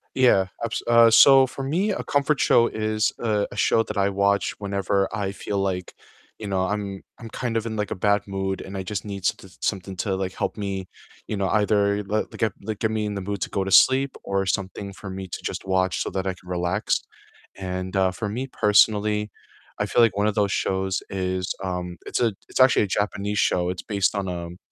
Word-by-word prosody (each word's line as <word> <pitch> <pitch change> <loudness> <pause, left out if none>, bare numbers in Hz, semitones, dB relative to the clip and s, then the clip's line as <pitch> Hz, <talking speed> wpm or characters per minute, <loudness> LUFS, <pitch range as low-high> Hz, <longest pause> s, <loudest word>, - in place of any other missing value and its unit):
Yeah, 120 -8 +4 0.2
abso 115 0 -2
uh, 115 -1 +7
so, 135 +3 +7
for 135 +1 -7
me, 175 +10 0
a 200 - -2
comfort 145 0 +1
show 115 - +5
is, 110 -1 0
uh, 105 -3 +1
a - - -9
show 115 - +3
that 105 -1 -6
I 100 0 +3
watch 100 0 +1
whenever 100 -1 0
I 100 -2 -2
feel 100 +1 -4
like, 95 -2 -2 0.4
you 105 - -7
know, 95 -1 0
I'm 100 -1 -3 0.2
I'm 115 -2 -9
kind 120 -1 -2
of 115 - -2
in, 110 -1 -3
like, 105 -2 -2
a - - -3
bad 100 +2 +2
mood 95 0 -3
and 95 0 -7
I 95 - -3
just 100 +1 -4
need 100 -2 -6
s 95 -1 -3
something 95 -1 -2
to, 95 0 -1
like, 95 -1 -3
help - - -2
me, 95 -3 -4 0.4
you - - -2
know, 100 -1 -1
either, 105 -1 +2
l 105 +2 0
like - - -11
get 110 -4 0
like 105 0 -4
get 110 - 0
me 110 -1 -1
in 105 - -4
the 100 - -3
mood 100 -1 -3
to - - -2
go 100 - -1
to 95 - -4
sleep 130 +7 +5
or 100 0 -1
something 100 +2 -3
for 100 0 -9
me 95 0 -6
to - - -6
just - - -4
watch 95 -1 +1
so - - -5
that 95 0 -2
I 95 - 0
can 90 - -20
relax, 90 +3 0 0.6
and, 95 0 -4
uh, 95 -1 +3
for 105 +3 -4
me 125 +6 -3
personally, 105 -2 +3 0.5
I - - 0
feel 120 - +4
like 110 -4 +3
one 105 +1 +2
of 105 - 0
those 100 -2 +1
shows 95 0 -1
is, 95 -1 -2
um, 90 -1 -4
it's - - -2
a 115 -3 +2 0.2
it's - - -4
actually 130 -3 +6
a 105 - -1
Japanese 105 0 -1
show, 90 0 +2
it's 90 - -4
based 100 -2 0
on, 100 -1 -2
um 85 0 -6
100 Hz, 230 wpm, -24 LUFS, 95-110 Hz, 0.6 s, uh